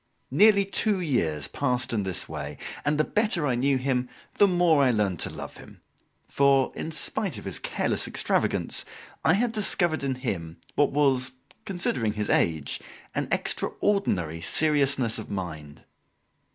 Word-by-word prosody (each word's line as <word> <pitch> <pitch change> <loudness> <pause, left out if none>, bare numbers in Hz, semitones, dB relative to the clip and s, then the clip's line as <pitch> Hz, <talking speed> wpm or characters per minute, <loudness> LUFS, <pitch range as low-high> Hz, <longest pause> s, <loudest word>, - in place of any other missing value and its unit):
Nearly 205 -2 +5
two 200 0 +1
years 80 - 0
passed 125 -3 -1
in 110 - +1
this 95 -3 -3
way, - - -6 0.3
and 150 +1 +1
the 155 - +3
better 210 -4 +1
I 130 - +1
knew 135 +3 +2
him, 125 -1 -1 0.3
the 205 - +7
more 175 -5 +3
I 135 - +4
learned 105 -7 0
to - - -2
love - - -8
him; - - -15 0.5
for, 140 -1 +3
in - - -5
spite 190 +3 -1
of - - -9
his - - -3
careless - - -1
extravagance, - - 0 0.4
I 160 - +5
had 230 +5 +1
discovered 175 -7 +1
in 135 -1 -1
him 90 -11 -4 0.2
what 145 - +3
was, 130 -3 +2 0.3
considering 135 - -1
his 105 -1 -2
age, 80 -4 +1 0.3
an - - -2
extraordinary 90 - 0
seriousness 140 - +2
of 110 - -8
mind. 80 -7 -6
135 Hz, 150 wpm, -26 LUFS, 105-170 Hz, 0.5 s, the